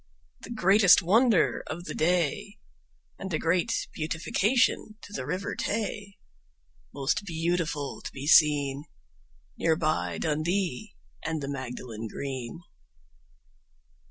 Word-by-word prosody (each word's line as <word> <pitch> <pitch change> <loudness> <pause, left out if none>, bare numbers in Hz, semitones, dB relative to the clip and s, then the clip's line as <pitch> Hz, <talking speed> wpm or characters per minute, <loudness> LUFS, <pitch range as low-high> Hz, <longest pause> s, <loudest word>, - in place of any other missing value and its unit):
The - - -11
greatest 195 -4 +5
wonder 220 +2 +3
of 170 +2 -5
the - - -6
day, 175 +5 0 0.6
And 190 -1 -5
a 155 - +1
great 180 +8 0
beautification 205 +8 0
to 205 - -11
the 130 - -4
River 185 +5 -2
Tay, 210 -2 -3 0.7
Most 140 +8 -1
beautiful 165 -4 -2
to - - -7
be 135 +1 -7
seen, 145 -2 +4 0.7
Near 165 -1 +3
by 155 -1 -1
Dundee 160 - -1 0.3
and 160 -1 -2
the 140 - -5
Magdalen 125 -4 -6
Green. 130 +5 -6
165 Hz, 110 wpm, -28 LUFS, 145-195 Hz, 0.7 s, greatest